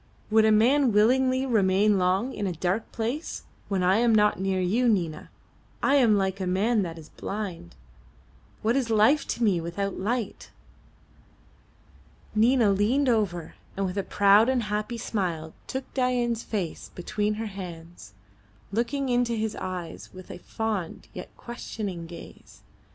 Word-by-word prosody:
"Would 220 Hz, 0 st, +5 dB
a 220 Hz, -, +5 dB
man 250 Hz, +5 st, +4 dB
willingly 255 Hz, +5 st, +3 dB
remain 205 Hz, -3 st, +3 dB
long 190 Hz, +8 st, +1 dB
in 205 Hz, -, -2 dB
a 180 Hz, -, -2 dB
dark 180 Hz, +6 st, -2 dB
place? 240 Hz, +8 st, -3 dB, 0.2 s
When 195 Hz, -2 st, 0 dB
I 185 Hz, +3 st, +4 dB
am 230 Hz, -1 st, +4 dB
not 210 Hz, -2 st, +3 dB
near 190 Hz, 0 st, 0 dB
you, 220 Hz, +7 st, +2 dB
Nina, 175 Hz, -7 st, -1 dB, 0.5 s
I 275 Hz, -, +3 dB
am 230 Hz, -6 st, +5 dB
like 190 Hz, 0 st, -1 dB
a 185 Hz, -, -1 dB
man 210 Hz, +5 st, +2 dB
that 170 Hz, -3 st, -4 dB
is 155 Hz, -2 st, -12 dB
blind. 190 Hz, -, -6 dB, 0.9 s
What 225 Hz, +3 st, +2 dB
is 260 Hz, -4 st, 0 dB
life 225 Hz, +7 st, +4 dB
to 240 Hz, -, -2 dB
me 190 Hz, -6 st, +3 dB
without 195 Hz, +4 st, -3 dB
light?" 225 Hz, +2 st, -3 dB, 1.8 s
Nina 225 Hz, 0 st, +4 dB
leaned 240 Hz, +8 st, +2 dB
over, 200 Hz, -8 st, 0 dB, 0.2 s
and 195 Hz, -, 0 dB
with 180 Hz, 0 st, -3 dB
a 200 Hz, -, 0 dB
proud 205 Hz, +4 st, +4 dB
and 255 Hz, -2 st, +1 dB
happy 210 Hz, +3 st, -3 dB
smile 170 Hz, -8 st, -3 dB
took 265 Hz, 0 st, -5 dB
Dain's 245 Hz, -3 st, 0 dB
face 195 Hz, -9 st, -4 dB
between 210 Hz, +3 st, -1 dB
her 225 Hz, +1 st, -4 dB
hands, 170 Hz, -, -9 dB, 0.6 s
looking 240 Hz, +6 st, -1 dB
into 245 Hz, -1 st, +1 dB
his 220 Hz, -1 st, -2 dB
eyes 180 Hz, -3 st, -6 dB
with 185 Hz, 0 st, -11 dB
a -, -, -8 dB
fond 210 Hz, -4 st, -4 dB
yet -, -, -8 dB
questioning 205 Hz, -7 st, -6 dB
gaze. 170 Hz, -, -13 dB
210 Hz, 150 wpm, -26 LUFS, 185-235 Hz, 1.8 s, Would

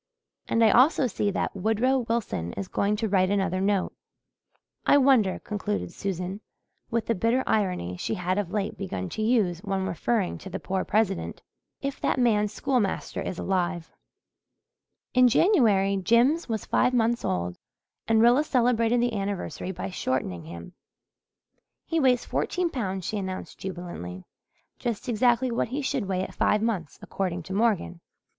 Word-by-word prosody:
And 230 Hz, -, +2 dB
I 220 Hz, -, +6 dB
also 265 Hz, +4 st, +5 dB
see 205 Hz, -3 st, 0 dB
that 200 Hz, -, -2 dB
Woodrow 225 Hz, +7 st, +1 dB
Wilson 225 Hz, -, -2 dB
is 100 Hz, -1 st, -5 dB
going 205 Hz, +1 st, 0 dB
to 220 Hz, +1 st, -1 dB
write 185 Hz, -2 st, +2 dB
another 190 Hz, -2 st, 0 dB
note. 195 Hz, -1 st, +1 dB, 0.9 s
I -, -, +5 dB
wonder," 260 Hz, -9 st, +4 dB
concluded 210 Hz, 0 st, -4 dB
Susan, 190 Hz, +1 st, -4 dB, 0.5 s
with 230 Hz, -1 st, -1 dB
the 230 Hz, -, +1 dB
bitter 230 Hz, +6 st, +1 dB
irony 180 Hz, -, 0 dB
she 220 Hz, -, -2 dB
had 185 Hz, +1 st, -1 dB
of 200 Hz, -4 st, -2 dB
late 205 Hz, +1 st, -3 dB
begun 95 Hz, -, -4 dB
to -, -, -4 dB
use 215 Hz, -7 st, +2 dB
when 195 Hz, -1 st, -2 dB
referring 190 Hz, +2 st, -1 dB
to 190 Hz, -, -9 dB
the -, -, -5 dB
poor 190 Hz, 0 st, -2 dB
President, 205 Hz, -3 st, -1 dB, 0.4 s
"if 275 Hz, 0 st, -3 dB
that -, -, +1 dB
man's 210 Hz, -4 st, +2 dB
schoolmaster 250 Hz, -8 st, -1 dB
is 180 Hz, -, -4 dB
alive." 180 Hz, -3 st, -1 dB, 1.2 s
In 255 Hz, 0 st, +6 dB
January 220 Hz, -, +3 dB
Jims 235 Hz, -, +3 dB
was 220 Hz, -3 st, -2 dB
five 250 Hz, 0 st, +2 dB
months 235 Hz, 0 st, +1 dB
old 90 Hz, -1 st, -2 dB, 0.5 s
and 225 Hz, 0 st, +4 dB
Rilla 245 Hz, +5 st, +5 dB
celebrated 245 Hz, -3 st, +2 dB
the 240 Hz, -1 st, 0 dB
anniversary 195 Hz, -2 st, -3 dB
by 195 Hz, +1 st, -5 dB
shortening 95 Hz, -, -2 dB
him. 85 Hz, +1 st, -9 dB, 1.1 s
"He 330 Hz, -, 0 dB
weighs 255 Hz, -4 st, +3 dB
fourteen 360 Hz, -2 st, -1 dB
pounds," 190 Hz, -, -3 dB
she 215 Hz, -, -2 dB
announced 190 Hz, -1 st, -6 dB
jubilantly. 175 Hz, -, -6 dB, 0.6 s
"Just 235 Hz, +1 st, -3 dB
exactly 240 Hz, +2 st, +2 dB
what 235 Hz, -, 0 dB
he 275 Hz, +5 st, -3 dB
should 265 Hz, -6 st, -1 dB
weigh 185 Hz, -1 st, -1 dB
at -, -, -7 dB
five 210 Hz, +1 st, +2 dB
months, 190 Hz, -10 st, -2 dB
according 180 Hz, -3 st, -3 dB
to 190 Hz, -, -7 dB
Morgan." 195 Hz, -, 0 dB
205 Hz, 155 wpm, -26 LUFS, 185-235 Hz, 1.2 s, I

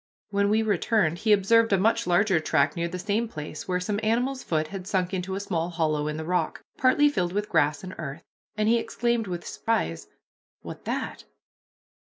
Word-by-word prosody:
When 200 Hz, 0 st, +2 dB
we 220 Hz, +1 st, +3 dB
returned, 200 Hz, -4 st, +1 dB
he 220 Hz, -, +1 dB
observed 225 Hz, +3 st, +4 dB
a 195 Hz, -, +5 dB
much 210 Hz, -1 st, +2 dB
larger 185 Hz, 0 st, +3 dB
track 155 Hz, -, +1 dB
near 170 Hz, 0 st, -1 dB
the 180 Hz, +2 st, -5 dB
same 210 Hz, +5 st, -1 dB
place, 155 Hz, -6 st, -7 dB
where 180 Hz, -1 st, 0 dB
some 205 Hz, +3 st, -2 dB
animal's 245 Hz, +5 st, 0 dB
foot 155 Hz, -2 st, -1 dB
had 190 Hz, -2 st, -7 dB
sunk 185 Hz, -2 st, 0 dB
into 190 Hz, +1 st, -2 dB
a -, -, -2 dB
small 175 Hz, -4 st, -2 dB
hollow 155 Hz, -3 st, 0 dB
in 150 Hz, 0 st, -3 dB
the 160 Hz, -, -5 dB
rock, 175 Hz, -1 st, -1 dB
partly 280 Hz, +3 st, +4 dB
filled 180 Hz, -11 st, 0 dB
with 205 Hz, +1 st, -2 dB
grass 150 Hz, -1 st, +2 dB
and 185 Hz, 0 st, -7 dB
earth, 155 Hz, 0 st, -6 dB, 0.3 s
and 215 Hz, 0 st, +1 dB
he 235 Hz, +1 st, +4 dB
exclaimed 235 Hz, -1 st, -1 dB
with 175 Hz, -2 st, -5 dB
surprise, 85 Hz, -, -2 dB, 0.6 s
"What -, -, -9 dB
that?" -, -, -4 dB
190 Hz, 195 wpm, -26 LUFS, 170-215 Hz, 0.6 s, a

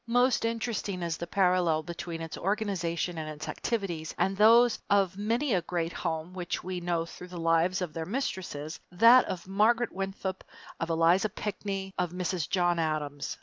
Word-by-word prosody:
Most 245 Hz, +1 st, +3 dB
interesting 220 Hz, -5 st, -2 dB
is 170 Hz, -1 st, -2 dB
the 170 Hz, -, -5 dB
parallel 180 Hz, -4 st, +2 dB
between 170 Hz, 0 st, -6 dB
its 160 Hz, -2 st, -6 dB
organization 180 Hz, -4 st, -1 dB
and 155 Hz, -1 st, -4 dB
its 155 Hz, 0 st, -7 dB
activities 180 Hz, -9 st, -3 dB
and 195 Hz, -, +1 dB
those 230 Hz, +3 st, +6 dB
of 195 Hz, -3 st, +3 dB
many 230 Hz, +6 st, 0 dB
a 180 Hz, -, +2 dB
great 170 Hz, 0 st, -2 dB
home 165 Hz, 0 st, -3 dB
which 180 Hz, -2 st, -4 dB
we 185 Hz, 0 st, -3 dB
know 170 Hz, -1 st, 0 dB
through 180 Hz, +1 st, -10 dB
the 180 Hz, -1 st, -9 dB
lives 165 Hz, +3 st, +2 dB
of 170 Hz, -, -5 dB
their 160 Hz, -1 st, -4 dB
mistresses, 185 Hz, -, -4 dB
that 230 Hz, +7 st, +7 dB
of 180 Hz, -1 st, -5 dB
Margaret 225 Hz, +5 st, +2 dB
Winthrop, 195 Hz, 0 st, -4 dB, 0.4 s
of -, -, -2 dB
Eliza 165 Hz, +5 st, +3 dB
Pinckney, 195 Hz, -1 st, -4 dB
of 180 Hz, -1 st, -1 dB
Mrs. 180 Hz, -3 st, -2 dB
John 175 Hz, -2 st, +2 dB
Adams. 150 Hz, -3 st, -2 dB
180 Hz, 170 wpm, -29 LUFS, 165-200 Hz, 0.4 s, that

